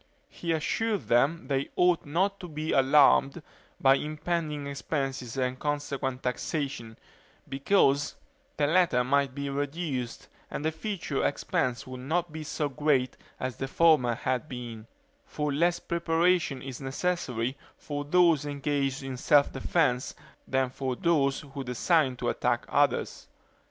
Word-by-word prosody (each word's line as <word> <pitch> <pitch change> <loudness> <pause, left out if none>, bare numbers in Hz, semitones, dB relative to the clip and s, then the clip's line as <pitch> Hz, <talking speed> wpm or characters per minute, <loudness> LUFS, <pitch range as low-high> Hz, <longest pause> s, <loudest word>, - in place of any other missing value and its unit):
He 170 - -4
assured 205 +7 -1
them 135 +5 +2
they 135 -1 -1
ought 180 -4 +3
not 190 +6 0
to 180 - -7
be 155 0 -4
alarmed 140 +2 +4 0.4
by 135 0 +5
impending 155 -1 -3
expenses 135 -3 -3
and 130 0 -1
consequent 140 -3 -2
taxation; 125 -3 -3 0.5
because 140 0 +2 0.4
the 145 - +2
latter 165 -5 +3
might 135 0 +1
be 140 0 -3
reduced, 140 -3 -3 0.2
and 150 - -4
the 160 - +2
future 160 -4 -3
expense 125 -3 -1
would 130 0 -8
not 165 +6 -1
be 155 0 -6
so 150 0 -2
great 140 -2 +1 0.2
as 130 -3 -3
the 135 - -3
former 135 -6 +4
had 130 +6 -2
been; 120 -4 -7 0.4
for 150 -1 -3
less 170 +4 +2
preparation 170 -4 +1
is 130 -1 -7
necessary 135 -4 -2 0.2
for 145 -1 -5
those 165 -1 +4
engaged 140 -2 -1
in 135 -1 -5
self 145 +2 +4
defense 135 -7 0 0.3
than 130 -1 +1
for 130 -1 -3
those 140 -3 +1
who 140 -2 -7
design 130 +2 +2
to - - -2
attack - - 0
others. - - +1
140 Hz, 135 wpm, -28 LUFS, 130-160 Hz, 0.5 s, by